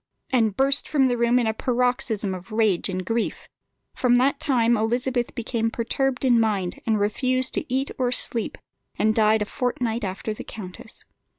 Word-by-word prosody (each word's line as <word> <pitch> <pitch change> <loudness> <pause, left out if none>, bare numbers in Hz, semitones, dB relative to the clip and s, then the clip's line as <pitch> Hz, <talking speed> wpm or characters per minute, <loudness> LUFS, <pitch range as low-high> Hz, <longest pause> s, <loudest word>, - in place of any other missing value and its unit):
and 225 -6 +2
burst 275 +1 +1
from 275 -3 +3
the 245 - +1
room 235 +1 +2
in 245 - +2
a 220 - 0
paroxysm 245 -4 0
of 185 +4 -9
rage 215 -4 +1
and 185 -1 -3
grief. 230 +3 -2 0.5
From 245 -1 +2
that 270 +3 +2
time 240 -5 +2
Elizabeth 240 +2 -1
became 230 -1 -1
perturbed 255 +3 -1
in 240 -2 +4
mind, 200 -5 -1
refused 250 +5 +1
to 290 - -2
eat 265 +2 0
or 250 -1 +1
sleep, 235 -2 +1 0.4
and 215 +1 +2
died 215 -1 +3
a - - -5
fortnight 240 0 -2
after 195 +3 -3
the - - -8
countess. 210 +1 -10
235 Hz, 170 wpm, -24 LUFS, 215-250 Hz, 0.5 s, in